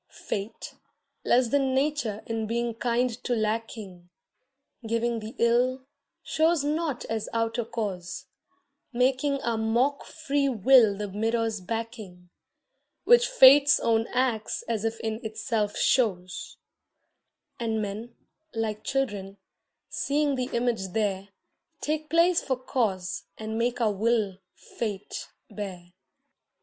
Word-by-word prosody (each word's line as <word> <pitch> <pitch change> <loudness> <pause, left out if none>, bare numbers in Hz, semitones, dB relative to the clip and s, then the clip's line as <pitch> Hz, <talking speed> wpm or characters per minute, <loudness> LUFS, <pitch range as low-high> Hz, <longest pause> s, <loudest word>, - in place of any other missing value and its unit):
Fate, 205 +3 -6 0.5
less 245 -1 +3
than 270 0 +2
Nature 265 -7 0
in 225 -1 -2
being 235 +1 -1
kind 240 +2 0
to 245 - 0
lacking, 215 -5 -3 0.8
Giving 230 +1 0
the 220 +2 -8
ill, 250 +3 +2 0.4
shows 320 -1 +2
not 300 -2 -1
as 220 -1 -3
outer 230 +1 0
cause, 195 -6 -4 0.7
Making 265 +3 +1
our 230 -1 0
mock 240 +6 +1
free 285 -3 -1
will 230 -3 +5
the 210 0 -3
mirror's 225 +1 -1
backing 215 -4 -6 0.7
Which 485 0 +6
Fate's 290 - +7
own 225 0 +2
acts 245 -4 -1
as 225 -3 -2
if 225 0 -2
in 220 +2 -3
itself 220 -1 -2
shows; 185 -8 0 1.0
And 225 -2 -1
men, 215 +3 -5 0.4
like 220 -2 -2
children, 205 -8 -2 0.5
seeing 290 0 0
the 255 -1 -2
image 235 -6 -1
there, 200 -3 -1 0.5
Take 310 +1 -2
place 335 +1 +4
for 260 - -1
cause 195 -9 -2
and 220 0 -5
make 240 +2 0
our 220 -3 +2
will 210 -2 0 0.2
Fate 205 -4 -5 0.2
bear. 185 -4 -7
230 Hz, 115 wpm, -27 LUFS, 210-255 Hz, 1.0 s, Fate's